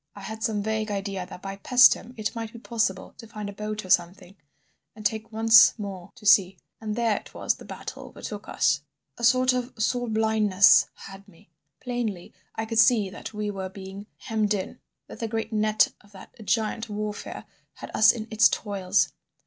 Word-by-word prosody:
I 200 - -10
had 220 +3 -7
some 215 -2 -1
vague 220 0 -2
idea 195 -2 -4
that 180 - -11
by 195 0 -6
Paestum 245 +2 +4
it 215 -1 -3
might 225 -1 -5
be 235 - -11
possible 220 -5 -2
to 230 - -10
find 210 -1 -7
a 200 - -7
boat 210 0 -5
or 185 - -5
something, 180 +2 0 0.6
and 215 -1 -12
take 220 +2 -1
once 225 +1 +6
more 195 -4 -7
to - - -16
sea. 195 -2 +5 0.2
And 215 -1 -4
there 230 -2 +1
it - - -11
was - - 0
the - - -13
battle - - -8
overtook 205 -2 -8
us. 150 0 +1 0.4
"A - - -8
sort 255 +2 +4
of 250 0 -3
soul 245 +2 0
blindness 215 -3 +4
had 195 +1 -12
me. 165 -3 -21 0.3
Plainly 235 -8 -4 0.2
I 220 - -3
could 225 0 -1
see 220 -5 +4
that - - -8
we 210 0 -2
were 190 -1 -5
being 195 +1 -10
hemmed 215 -2 -1
in; 190 - -6 0.3
that - - -12
the 230 - -2
great 225 0 -4
net 215 0 +3
of 205 0 -22
that 190 - -13
giant 225 0 -1
Warfare 210 0 -5 0.3
had - - -9
us 220 +1 +6
in 225 -2 -6
its 220 0 +5
toils. 195 -4 0
215 Hz, 190 wpm, -25 LUFS, 195-225 Hz, 0.6 s, once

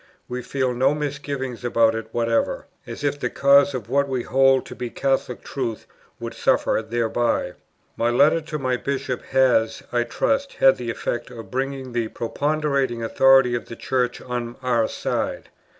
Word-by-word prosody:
We 125 0 -4
feel 130 0 -1
no 130 +4 +2
misgivings 140 -4 -4
about 115 -2 +3
it 110 0 -4
whatever, 115 -1 0 0.2
as - - -7
if 145 0 0
the - - -1
cause 140 0 +4
of 115 -4 -5
what 140 +3 +1
we 130 -2 -1
hold 135 0 +3
to - - -9
be 125 -1 -4
Catholic 135 -1 -1
truth 120 -5 -4 0.3
would - - -5
suffer - - +1
thereby. 115 -4 -1 0.4
My 115 - +1
letter 150 +7 +4
to 155 0 -5
my 130 -3 0
Bishop 130 -2 -3
has, 125 -4 +2
I 120 - +2
trust, 275 - -1
had 135 - +5
the 120 -1 -5
effect 120 +1 -3
of 115 -5 -10
bringing 135 0 -3
the 120 -2 0
preponderating 140 0 -1
authority 135 +1 +5
of 120 -2 -3
the 115 - -8
Church 125 0 -1
on 120 -1 -4
our 120 -3 +2
side. - - -3
125 Hz, 165 wpm, -23 LUFS, 120-135 Hz, 0.4 s, had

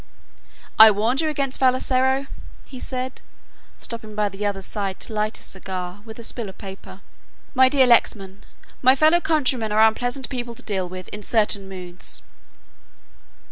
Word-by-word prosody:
"I 220 0 +12
warned 225 +7 +1
you 315 - 0
against 275 -3 -2
Vassalaro," 260 +1 +2 0.4
he 260 - -10
said, 255 0 -5 0.6
stooping 220 -2 -7
by 210 -1 +1
the 195 +1 -7
other's 195 -2 -3
side 195 -3 -2
to - - -6
light 215 +1 -1
his - - -9
cigar 185 0 -6
with 220 -1 -10
a 235 - -9
spill 225 -2 -3
of 190 - -13
paper. 195 -1 -10 0.5
"My 260 -1 +5
dear 270 -1 +4
Lexman, 200 -5 +2 0.4
my 260 +1 +6
fellow 315 +5 +4
countrymen 260 -9 +1
are 220 +1 +6
unpleasant 245 +4 -2
people 240 -3 -5
to - - -11
deal 190 -4 -2
with 185 0 -8
in 210 - -7
certain 210 -3 +1
moods." 180 -1 -5
220 Hz, 160 wpm, -22 LUFS, 200-255 Hz, 0.6 s, I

